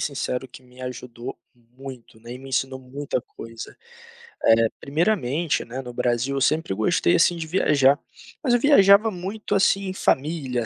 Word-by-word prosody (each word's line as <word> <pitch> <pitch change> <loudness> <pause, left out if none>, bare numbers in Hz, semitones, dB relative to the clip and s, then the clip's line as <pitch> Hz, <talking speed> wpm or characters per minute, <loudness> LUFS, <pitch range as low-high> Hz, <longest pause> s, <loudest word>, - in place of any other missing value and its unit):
sincero, 130 -2 -3
que 130 - -14
me 125 0 -17
ajudou 125 -1 -7 0.2
muito, 120 -1 -13
né, 120 +1 -9
e 125 - -9
me 135 0 -11
ensinou 130 0 -1
muita 130 +1 -4
coisa. 115 0 -10 0.7
Eh, 115 0 +5
primeiramente, 155 - 0
né, 125 +3 -6
no 125 -2 -9
Brasil, 120 +3 0
eu 135 - -1
sempre 155 -6 +1
gostei, 165 - +2
assim, 175 0 +4
de 165 -1 -5
viajar, 145 -5 +3 0.4
mas 255 -5 +2
eu 245 - +4
viajava 215 -6 +6
muito, 195 +4 -5
assim, 195 0 +2
em 185 - -3
família, 135 -8 -1
135 Hz, 165 wpm, -23 LUFS, 125-175 Hz, 0.7 s, viajava